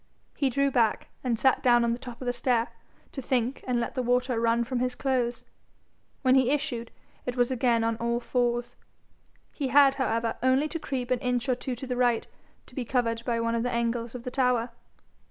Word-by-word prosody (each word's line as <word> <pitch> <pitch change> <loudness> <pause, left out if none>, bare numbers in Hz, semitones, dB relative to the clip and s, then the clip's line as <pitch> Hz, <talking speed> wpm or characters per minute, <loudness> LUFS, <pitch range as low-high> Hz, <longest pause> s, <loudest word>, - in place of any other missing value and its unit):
He 275 - +1
drew 275 +2 +1
back, 235 -4 +1
and 245 -3 0
sat 265 +3 +3
down 240 -1 +4
on 235 - +1
the 235 - -2
top 245 -1 -9
of - - -6
the 245 - 0
stair 240 -2 +1 0.4
to 270 - -5
think 250 0 -1
and 245 -1 +1
let 235 - -3
the 255 - -1
water 250 0 +1
run 230 +1 +2
from 245 +1 -2
his 250 0 -1
clothes. 245 -3 -1 0.8
When 255 -1 +5
he 260 -2 +4
issued, 240 -5 -1 0.4
it 250 0 -3
was 245 +1 +2
again 235 -2 +2
on 225 0 0
all 235 +1 -1
fours. 240 0 -1 0.8
He 280 - -3
had, 275 +1 +6
however, 230 -2 0
only 260 +4 +3
to 330 - -4
creep 255 -4 -4
an 250 - +2
inch 250 -1 -1
or 255 - +3
two 250 +1 -4
to 250 - -7
the 250 -1 -3
right 245 -2 +2 0.4
to - - -18
be 255 - -3
covered 230 -2 -1
by 235 -2 0
one 230 0 0
of 230 - 0
the 245 - -1
angles 235 0 -1
of 245 - -7
the 250 - -5
tower. 250 -3 +1
245 Hz, 215 wpm, -27 LUFS, 235-255 Hz, 0.8 s, had